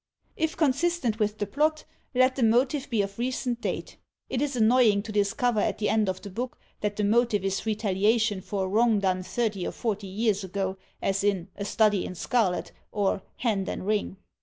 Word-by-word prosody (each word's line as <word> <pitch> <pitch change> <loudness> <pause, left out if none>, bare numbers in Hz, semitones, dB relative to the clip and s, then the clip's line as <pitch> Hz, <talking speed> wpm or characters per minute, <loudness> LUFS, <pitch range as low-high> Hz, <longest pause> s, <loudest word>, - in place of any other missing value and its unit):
If 320 0 -1
consistent 280 -5 +1
with 210 0 0
the 205 - -1
plot, 305 +5 0 0.3
let 255 +1 +4
the 270 - -3
motive 255 +5 +2
be 225 -5 +2
of 200 +2 -7
recent 245 -1 -2
date. - - -4 0.3
It 255 - 0
is 285 -2 -1
annoying 225 -3 +4
to 220 - -7
discover 215 +3 +1
at - - 0
the 210 -1 0
end 215 -3 +2
of 185 0 -4
the 200 - -7
book 245 +5 -4 0.2
that 210 0 -2
the 210 - -1
motive 215 -1 +2
is 195 +3 -1
retaliation 215 0 +1
for 195 0 -2
a - - -2
wrong 220 +3 +3
done 185 -2 +1
thirty 210 -1 -2
or - - -3
forty 210 -4 -3
years 205 +1 0
ago, 190 0 -3 0.2
as 195 0 +1
in 195 -3 0
" - - -40
A 200 - -4
Study 210 -2 +2
in 185 - -6
Scarlet 200 -2 0
" - - -46
or 200 -2 0
" - - -40
Hand 205 -6 +1
and - - -4
Ring." 210 -2 -1
215 Hz, 210 wpm, -27 LUFS, 200-240 Hz, 0.3 s, let